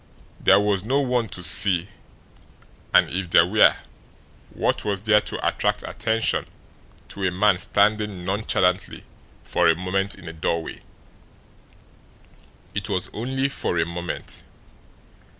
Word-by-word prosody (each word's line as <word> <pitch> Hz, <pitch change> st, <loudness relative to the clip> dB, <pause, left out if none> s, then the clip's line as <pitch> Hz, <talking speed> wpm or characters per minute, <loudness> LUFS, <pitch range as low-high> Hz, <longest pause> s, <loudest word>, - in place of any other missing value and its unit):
There -, -, +5 dB
was 100 Hz, -2 st, 0 dB
no 130 Hz, +6 st, 0 dB
one 125 Hz, -4 st, 0 dB
to 90 Hz, -, -6 dB
see, 90 Hz, +2 st, +5 dB, 1.0 s
and -, -, +5 dB
if 90 Hz, 0 st, -4 dB
there 85 Hz, 0 st, +5 dB
were, 110 Hz, +5 st, +4 dB, 0.7 s
what -, -, -2 dB
was 100 Hz, -2 st, -3 dB
there 105 Hz, -1 st, +4 dB
to -, -, -3 dB
attract -, -, -1 dB
attention 115 Hz, 0 st, -1 dB, 0.6 s
to 100 Hz, -, -7 dB
a 95 Hz, -, +2 dB
man 95 Hz, +1 st, +2 dB
standing 105 Hz, -3 st, 0 dB
nonchalantly 95 Hz, -2 st, -1 dB, 0.4 s
for 85 Hz, -, +1 dB
a 80 Hz, -, +4 dB
moment 95 Hz, +3 st, -2 dB
in 85 Hz, -, -14 dB
a 80 Hz, -, -7 dB
doorway? 80 Hz, +1 st, -3 dB, 1.9 s
It -, -, -4 dB
was -, -, -2 dB
only 130 Hz, +4 st, -2 dB
for 140 Hz, -9 st, -3 dB
a -, -, +1 dB
moment. 85 Hz, 0 st, -6 dB
95 Hz, 130 wpm, -23 LUFS, 90-110 Hz, 1.9 s, There